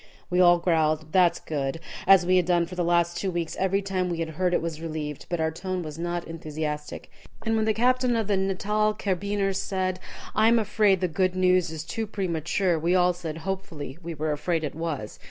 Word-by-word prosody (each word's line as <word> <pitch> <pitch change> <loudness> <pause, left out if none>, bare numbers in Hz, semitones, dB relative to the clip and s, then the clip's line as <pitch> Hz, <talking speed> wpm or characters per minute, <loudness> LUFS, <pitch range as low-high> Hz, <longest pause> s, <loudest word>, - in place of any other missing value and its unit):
We 180 - +2
all 175 -1 +7
growled 155 -3 +1
"That's 180 -2 +4
good," 140 0 -3 0.3
as 190 -2 +7
we 185 +1 +4
had 180 - +3
done 175 -1 +3
for 175 - -10
the 180 -1 -1
last 170 0 +2
two 195 - -1
weeks 170 -2 -3
every 195 +1 +1
time 185 -2 -1
we 170 - -2
had 165 -1 -2
heard 180 +3 0
it - - +2
was 165 -2 -4
relieved, 155 -3 -5
but 175 - -1
our 160 0 +1
tone 185 +2 -4
was 155 0 -7
not 175 0 -3
enthusiastic. 155 -2 -5 0.3
And 225 0 +1
when 220 -1 +1
the 220 - +2
captain 250 +1 +2
of 225 -1 0
the 200 0 +1
Natal 210 +3 0
Carbineers 195 0 -1
said, 185 -2 -2 0.3
"I 220 - +4
am 235 +1 +5
afraid 210 -3 +2
the 180 - +2
good 185 +3 0
news 185 -1 +3
is 160 -1 -5
too 220 +7 -4
premature," 175 -2 0
we 170 +3 +2
all 180 0 +4
said, 165 -3 -6
hopefully, 165 -7 -5
we 170 -1 -6
were 155 +1 -1
afraid 160 +2 -1
it 150 - -3
was. 155 -9 -4
175 Hz, 215 wpm, -26 LUFS, 160-195 Hz, 0.3 s, all